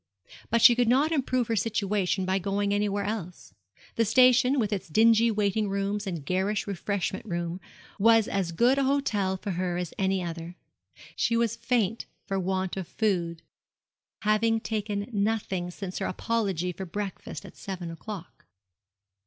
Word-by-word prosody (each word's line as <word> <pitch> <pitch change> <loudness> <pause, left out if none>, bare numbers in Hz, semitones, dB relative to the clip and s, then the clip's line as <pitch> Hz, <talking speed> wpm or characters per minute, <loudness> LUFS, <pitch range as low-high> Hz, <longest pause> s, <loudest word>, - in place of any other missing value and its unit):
But 230 0 +2
she 240 - +10
could 240 0 +2
not 275 +7 +3
improve 255 -5 0
her 230 - 0
situation 200 -3 0
by 190 +1 +1
going 200 +2 0
anywhere 205 0 0
else. 195 - -5 0.4
The 230 - +4
station, 250 +3 +5
with 215 -4 +1
its 195 - -3
dingy 225 +5 +5
waiting 210 -1 0
rooms 200 +1 -2
and 170 -6 -4
garish 190 +4 0
refreshment 200 0 -2
room, 175 0 -3 0.4
was 225 +1 +5
as 190 -4 -1
good 245 +10 +3
an 275 - +2
hotel 210 -9 +1
for 200 +1 -4
her 180 0 -1
as 180 -3 -4
any 190 -1 +1
other. 170 0 -6 0.6
She 230 0 +1
was 230 -1 +1
faint 230 -2 0 0.2
for 195 -1 -1
want 190 0 -2
of 185 -3 -4
food, 175 -6 -1 0.8
having 220 +2 +2
taken 210 -2 -3
nothing 200 -4 -1
since 185 +1 -6
her - - -1
apology 190 -4 -1
for 190 +2 -7
breakfast 190 -5 -5
at - - -12
seven 180 -4 -6
o'clock. 185 +1 -9
200 Hz, 155 wpm, -27 LUFS, 185-225 Hz, 0.8 s, she